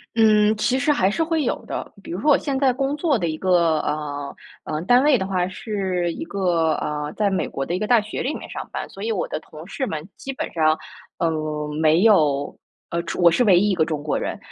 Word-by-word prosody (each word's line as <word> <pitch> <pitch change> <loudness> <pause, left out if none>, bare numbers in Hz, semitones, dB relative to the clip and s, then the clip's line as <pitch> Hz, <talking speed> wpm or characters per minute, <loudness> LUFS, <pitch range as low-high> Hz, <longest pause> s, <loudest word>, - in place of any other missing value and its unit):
嗯， 215 -1 +5
其 245 +4 +1
实 280 +3 +2
还 190 -9 +2
是 325 +10 0
会 320 -2 0
有 - - -2
的。 - - -5
比 - - -8
如 175 - -3
说 300 - +1
我 - - +6
现 280 -3 -2
在 265 -3 +3
工 275 +2 -1
作 300 -4 +2
的 170 -5 -1
一 155 - -3
个， 170 -4 +2
呃， 145 -2 -4 0.3
呃， 155 0 -3
单 245 +7 +4
位 290 -4 +5
的 190 - -2
话 185 -2 0
是 185 -3 -2
一 320 - -6
个， 175 - +1
呃， 150 0 -3
在 210 -2 +1
美 190 - -1
国 135 - -4
的 170 - -3
一 - - -2
个 215 - -2
大 240 -3 +5
学 215 - -5
里 290 - -1
面 - - -8
上 - - -7
班， - - -4
所 195 - -11
以 225 - -2
我 200 - -1
的 - - -3
同 155 +1 -12
事 255 +7 -3
们 155 0 -4
基 270 - -6
本 - - -5
上， 155 -1 +2 0.4
呃， 165 -2 +1 0.5
没 160 +3 +4
有 150 -10 +3 0.4
呃 170 0 -1
中 175 - -4
我 170 -1 +7
是 210 - +1
唯 190 -4 +6
一 205 +4 +3
一 - - +2
个 160 -3 +2
中 155 -2 -3
国 150 - -1
人， - - -3
185 Hz, 270 characters per minute, -22 LUFS, 160-230 Hz, 0.5 s, 我